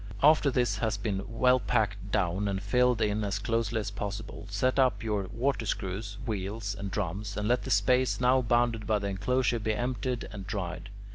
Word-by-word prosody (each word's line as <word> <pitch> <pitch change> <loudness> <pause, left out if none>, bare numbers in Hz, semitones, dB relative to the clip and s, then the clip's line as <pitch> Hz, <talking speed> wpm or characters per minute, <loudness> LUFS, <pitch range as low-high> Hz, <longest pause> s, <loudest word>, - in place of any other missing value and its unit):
After 150 -1 +6
this 120 -6 +1
has 110 -2 0
been 100 -2 -2
well 125 +3 +3
packed 100 -4 -1
down 100 0 +1
and 95 -1 -1
filled 125 +4 +2
in 105 0 0
as 100 0 -1
closely 115 +1 0
as 100 - -4
possible, 100 0 -6
set 130 +7 +1
up 125 -5 +3
your 105 -4 -1
water 120 0 -1
screws, 100 +1 -3
wheels, 105 -1 -3
and 100 0 -5
drums, 100 +1 -3
and 105 0 -1
let 125 +2 +2
the - - -4
space 130 0 +3
now 130 +1 +4
bounded 120 -2 +1
by 110 -2 +3
the 100 -1 -3
enclosure 120 +5 +1
be 110 0 -1
emptied 125 0 -2
and 100 -3 -8
dried. 95 -3 -4
110 Hz, 190 wpm, -29 LUFS, 100-120 Hz, -, After